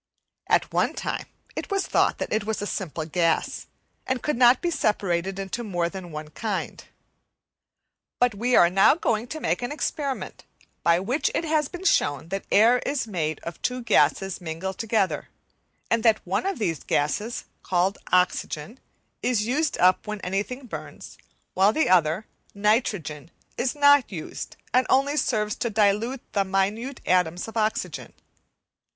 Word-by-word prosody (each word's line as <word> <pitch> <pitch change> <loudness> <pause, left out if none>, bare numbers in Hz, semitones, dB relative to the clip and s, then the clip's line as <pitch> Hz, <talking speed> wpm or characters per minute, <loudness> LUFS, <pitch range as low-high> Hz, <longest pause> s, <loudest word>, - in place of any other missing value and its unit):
At - - +2
one - - +1
time - - -3 0.3
it - - -5
was 395 -1 0
thought - - +2
that - - -3
it 215 - +1
was 220 +1 -2
a 205 - -3
simple 170 -6 -4
gas 165 +1 0 0.4
and 260 -2 -1
could 300 - 0
not 245 +1 +6
be 345 - -1
separated 195 - 0
into 195 +5 -4
more 175 -5 -1
than 185 -2 -8
one 155 0 -7
kind. 205 +4 -4 1.4
But 245 -2 +3
we 240 +5 +1
are 170 0 +6
now 195 +8 +5
going 235 -8 -1
to 315 - -6
make - - -1
an 245 - -3
experiment 290 -2 -3 0.4
by 170 0 +4
which 245 +11 0
it - - 0
has 305 -2 +1
been 355 +4 -9
shown 145 - +2
that 195 +1 -4
air 230 +4 +6
is 280 -1 -2
made 160 -8 -3
of 170 - -7
two 250 -1 -2
gases 195 -4 +2
mingled 175 +3 -5
together, 215 -4 0 0.6
and 230 - +3
that 220 -1 +3
one 190 - -1
of 390 - -1
these 170 - -2
gases, 210 +11 -1 0.2
called 185 +2 0
oxygen, 180 - 0 0.4
is 240 -4 +1
used 295 +6 0
up 185 +3 +3
when 215 0 -4
anything 205 +8 -3
burns, 240 - -9 0.3
while 195 +2 +4
the 315 +8 +1
other 180 +2 +3 0.3
nitrogen 200 - 0 0.3
is 255 +4 -1
not 285 -4 +5
used, 165 -5 -7 0.2
and 255 +1 +3
only 275 +2 +3
serves 215 -7 0
to 235 - -1
dilute 220 +4 +1
the 200 - +2
minute 205 +7 -1
atoms 180 0 +1
of 225 - -10
oxygen. 220 -1 -2
210 Hz, 160 wpm, -25 LUFS, 180-250 Hz, 1.4 s, not